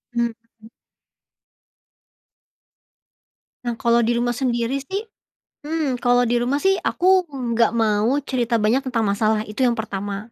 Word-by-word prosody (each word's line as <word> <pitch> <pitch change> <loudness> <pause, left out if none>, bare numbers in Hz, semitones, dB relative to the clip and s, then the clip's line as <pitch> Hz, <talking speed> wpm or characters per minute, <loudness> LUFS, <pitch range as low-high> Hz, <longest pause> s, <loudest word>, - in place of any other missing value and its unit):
Mmm, 235 -1 0 0.3
mhm. 220 - -14 3.0
Nah 240 - -2
kalau 235 0 +2
di 235 +1 +1
rumah 240 0 0
sendiri 245 +1 -1
sih, 385 +10 -4 0.6
mmm, 300 -6 -1
kalau 245 0 +3
di 240 0 +1
rumah 255 +4 0
sih 385 0 +3
aku 370 0 +2
nggak 235 -5 0
mau 215 -1 +2 0.2
cerita 240 -3 -1
banyak 230 +5 +1
tentang 230 -3 0
masalah 215 +1 +1
itu 225 +4 0
yang 235 - +1
pertama 205 0 -5
235 Hz, 135 wpm, -21 LUFS, 225-260 Hz, 3.0 s, kalau